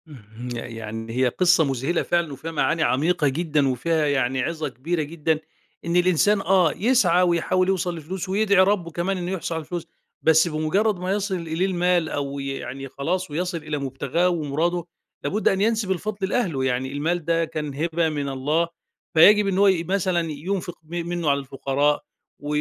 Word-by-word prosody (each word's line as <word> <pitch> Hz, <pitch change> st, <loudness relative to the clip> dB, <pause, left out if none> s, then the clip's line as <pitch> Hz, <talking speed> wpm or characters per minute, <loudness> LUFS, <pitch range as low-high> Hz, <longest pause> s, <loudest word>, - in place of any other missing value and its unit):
اهم، 120 Hz, -4 st, -10 dB
يعني 115 Hz, -1 st, -6 dB
هي 130 Hz, 0 st, +3 dB
قصّة 180 Hz, +5 st, +3 dB
مذهلة 135 Hz, +4 st, 0 dB
فعلًا 170 Hz, -4 st, 0 dB
وفيها 155 Hz, +5 st, -6 dB
معاني 165 Hz, +1 st, +1 dB
عميقة 150 Hz, +3 st, +2 dB
جدًا 150 Hz, 0 st, +1 dB
وفيها 150 Hz, +5 st, 0 dB
يعني 130 Hz, -2 st, +1 dB
عظة 160 Hz, +3 st, -2 dB
كبيرة 160 Hz, +7 st, -2 dB
جدًا، 155 Hz, 0 st, -1 dB, 0.5 s
إن 170 Hz, +1 st, -1 dB
الإنسان، 185 Hz, +3 st, +3 dB
آه، 185 Hz, -3 st, +3 dB
يسعى 195 Hz, -6 st, +3 dB
ويحاول 180 Hz, +1 st, +2 dB
يوصل 180 Hz, -2 st, -1 dB
لفلوس 180 Hz, +4 st, -6 dB
ويدعي 200 Hz, -1 st, +4 dB
ربُّه 190 Hz, -4 st, 0 dB
كمان 175 Hz, +4 st, -1 dB
إنه 180 Hz, 0 st, -3 dB
يحصل 175 Hz, -3 st, -3 dB
على 160 Hz, -, -3 dB
فلوس، 170 Hz, 0 st, -5 dB, 0.3 s
بس 160 Hz, +1 st, +5 dB
بمجرد 175 Hz, +6 st, 0 dB
ما 180 Hz, +1 st, -2 dB
يصل 200 Hz, -1 st, -1 dB
إليه 165 Hz, +1 st, -1 dB
المال 180 Hz, -3 st, +1 dB
أو 140 Hz, -1 st, -3 dB
ي 140 Hz, -, -4 dB
يعني 135 Hz, 0 st, -5 dB
خلاص 170 Hz, +6 st, -3 dB
ويصل 175 Hz, +3 st, -2 dB
إلى 155 Hz, -1 st, -4 dB
مبتغاه 140 Hz, +5 st, 0 dB
ومراده، 170 Hz, +1 st, -1 dB, 0.4 s
لابد 210 Hz, +2 st, 0 dB
أن 195 Hz, -, +2 dB
ينسب 215 Hz, -2 st, +1 dB
الفضل 195 Hz, +1 st, -2 dB
لأهله، 170 Hz, -, 0 dB
يعني 130 Hz, 0 st, -1 dB
المال 160 Hz, +3 st, -1 dB
ده 165 Hz, 0 st, +2 dB
كان 155 Hz, -3 st, -5 dB
هبة 165 Hz, +2 st, 0 dB
من 145 Hz, -2 st, -3 dB
الله، 150 Hz, +5 st, 0 dB, 0.5 s
فيجب 205 Hz, +6 st, +7 dB
إن 190 Hz, -1 st, 0 dB
هو 200 Hz, +1 st, +5 dB
ي 185 Hz, -4 st, +3 dB
مثلًا 175 Hz, -2 st, 0 dB
ينفق 175 Hz, +4 st, -4 dB
م 170 Hz, +2 st, -5 dB
منه 175 Hz, -3 st, -1 dB
على 140 Hz, 0 st, +2 dB
الفقراء، 140 Hz, +2 st, 0 dB, 0.4 s
و 145 Hz, -, -9 dB
165 Hz, 175 wpm, -23 LUFS, 145-180 Hz, 0.5 s, فيجب